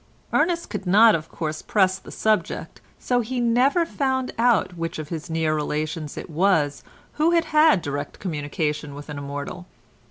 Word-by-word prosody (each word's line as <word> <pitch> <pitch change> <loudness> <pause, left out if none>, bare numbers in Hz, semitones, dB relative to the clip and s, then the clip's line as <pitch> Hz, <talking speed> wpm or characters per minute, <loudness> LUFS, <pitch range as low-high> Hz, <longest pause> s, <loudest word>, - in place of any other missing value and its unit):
Ernest 335 +2 +1
could 200 -3 -5
not 215 +4 +7
of 160 -1 -2
course 155 -2 -4
press 190 -2 +2
the - - -13
subject, 215 -1 -1 0.2
so 245 -1 0
he 245 +2 -2
never 250 +8 +3
found 265 -4 -1
out 230 -6 +3
which 165 -1 -4
of 155 -1 -6
his 160 -3 -5
near 160 -1 0
relations 155 +1 -3
it - - -6
was 160 -4 +1 0.4
who 320 - +5
had 335 -1 +3
had 305 - +4
direct 145 0 -4
communication 150 -3 -3
with 145 +1 -10
an 145 -1 -5
immortal. 145 +6 -6
175 Hz, 165 wpm, -23 LUFS, 150-240 Hz, 0.4 s, not